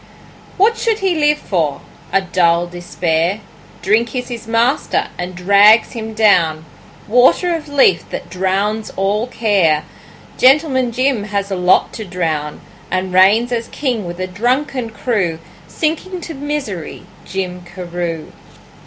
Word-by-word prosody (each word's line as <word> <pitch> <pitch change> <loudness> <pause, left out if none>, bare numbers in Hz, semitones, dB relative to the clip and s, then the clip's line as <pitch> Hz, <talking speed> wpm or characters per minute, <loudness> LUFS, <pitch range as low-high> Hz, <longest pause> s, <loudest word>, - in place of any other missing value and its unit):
What 440 +4 +3
should 455 -2 +1
he 385 -3 0
live 300 -2 +2
for? 160 - -2 0.3
A 195 - +3
dull 175 -2 +2
despair! 175 +1 -2 0.4
Drink 220 +5 +1
is 250 0 -3
his 230 -2 -7
master 235 +5 +1
and 180 +1 -6
drags 200 +5 +5
him 220 -1 -6
down, 170 -8 +3 0.4
Water 250 - +4
of 310 -3 -5
Lethe 270 -11 +3
that - - -6
drowns 195 +4 -1
all 205 +4 0
care. 195 -11 +1 0.5
Gentleman 260 -2 +4
Jim 255 -3 0
has 200 -1 -3
a - - 0
lot 180 0 +2
to 220 - -6
drown, 160 -6 -3 0.3
And 185 +1 -1
he - - -9
reigns 205 +6 +4
as 230 -1 -2
king 245 -8 -2
with 175 +1 -7
a 185 - -1
drunken 245 +6 -1
crew, 205 -6 -1 0.3
Sinking 330 - -2
to 330 - -7
misery, 275 - -5 0.2
Jim 180 -1 -4
Carew. 175 -2 -5
205 Hz, 140 wpm, -17 LUFS, 180-250 Hz, 0.5 s, drags